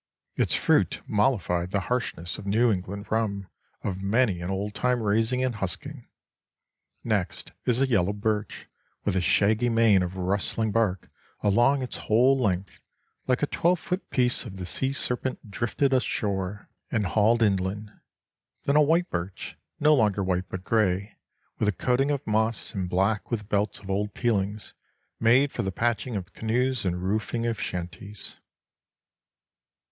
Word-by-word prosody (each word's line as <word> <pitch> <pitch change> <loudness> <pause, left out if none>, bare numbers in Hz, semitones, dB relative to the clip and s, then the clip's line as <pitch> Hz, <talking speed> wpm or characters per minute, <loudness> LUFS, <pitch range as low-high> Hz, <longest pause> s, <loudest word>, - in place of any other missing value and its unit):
Its - - +1
fruit - - +2
mollified 100 -6 +1
the 100 +1 0
harshness 115 -8 -3
of 100 - -9
the - - -3
New 115 +3 +4
England 100 +1 -4
rum 100 -3 -1 0.4
of 95 -1 -3
many 100 -2 +2
an 85 - -4
old 100 +2 -2
time 125 +2 +1
raising 115 +4 +1
and 125 -4 -1
husking. 95 -4 -5 1.0
Next - - -2 0.2
is 125 0 +2
a 135 - +3
yellow 100 -6 +2
birch 105 0 -2 0.4
with - - +1
a 95 - +2
shaggy 110 +6 +3
mane 115 -4 +4
of 90 +1 -3
rustling 100 +4 0
bark 105 -4 0 0.3
along 120 +7 +3
its 125 - -4
whole 125 +5 +4
length, 95 -7 -1 0.5
like 130 +2 +1
a - - +6
twelve 175 +4 +1
foot 180 +4 -4
piece 125 -1 +2
of 105 -6 -8
the 95 -1 -5
sea 130 +9 0
serpent 125 -4 -2
drifted 130 +6 0
ashore 100 -5 -1 0.2
and 110 -3 +1
hauled 110 +4 +3
inland; 100 +1 0 0.7
then 140 - +1
a 150 - +7
white 165 +4 +2
birch, 90 +2 -4 0.2
no 150 +1 +5
longer 105 -7 +2
white, 95 0 -1
but 95 -1 -6
gray 100 -1 +1 0.4
with 105 - +1
a - - +4
coating 125 +7 +1
of 145 -2 -1
moss, 110 +1 0
and 95 -3 -3
black 100 +4 +1
with 105 -3 -3
belts 105 0 0
of 100 -1 -7
old 105 +1 -1
peelings, 105 -3 -1 0.5
made 125 +5 +4
for - - -2
the 95 -3 -2
patching 120 +3 -1
of 95 -3 -5
canoes 125 +1 0
and 90 0 -1
roofing 110 +4 -1
of 115 -2 -1
shanties. 90 +4 -5
105 Hz, 160 wpm, -26 LUFS, 95-120 Hz, 1.0 s, a